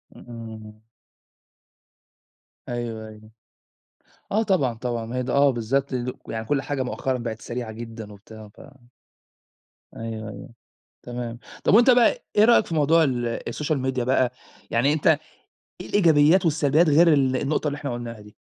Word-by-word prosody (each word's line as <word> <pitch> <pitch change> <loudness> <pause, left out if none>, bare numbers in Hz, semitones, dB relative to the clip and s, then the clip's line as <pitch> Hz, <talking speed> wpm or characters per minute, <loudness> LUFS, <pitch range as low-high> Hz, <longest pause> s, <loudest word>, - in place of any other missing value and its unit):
إمم. 110 -2 -10 1.9
أيوه، 115 -2 -4
أيوه. 110 0 -14 1.0
آه 220 +3 +2
طبعًا، 160 - +1
طبعًا 115 -1 -4
ما 120 +3 -6
هي 125 - -1
ده، - - -3
آه 140 0 +5
بالضبط، 130 +3 -1
ل 125 0 -2 0.2
يعني 110 0 -4
كل 140 +2 0
حاجة 135 0 -2
مؤخرًا 130 +1 -2
بقت 115 -2 -5
سريعة 120 -2 -5
جدًا 110 -2 -9
وبتاع، 110 +1 -13
ف - - -15 1.3
أيوه، 110 -1 -6
أيوه. - - -9 0.6
تمام. 120 -1 -6 0.2
طَب - - +3
وأنت 240 +4 +6
بقى 245 -1 +4
إيه 210 +1 +6
رأيك 235 -2 +5
في 165 - -4
موضوع 160 +2 +4
ال 120 -4 -1
الSocial 150 0 -2
Media 130 -1 -1
بقى؟ 130 -1 +2 0.4
يعني 135 +6 +2
أنت 155 - -1 0.7
إيه - - -9
الإيجابيات 170 -1 +4
والسلبيات 155 +1 +3
غير 165 +4 +5
ال 130 -2 +2
النقطة 150 +2 -1
اللي 145 - -2
إحنا 140 -4 -4
قُلناها 115 -2 -7
دي؟ 105 0 -15
125 Hz, 155 wpm, -24 LUFS, 115-145 Hz, 1.9 s, وأنت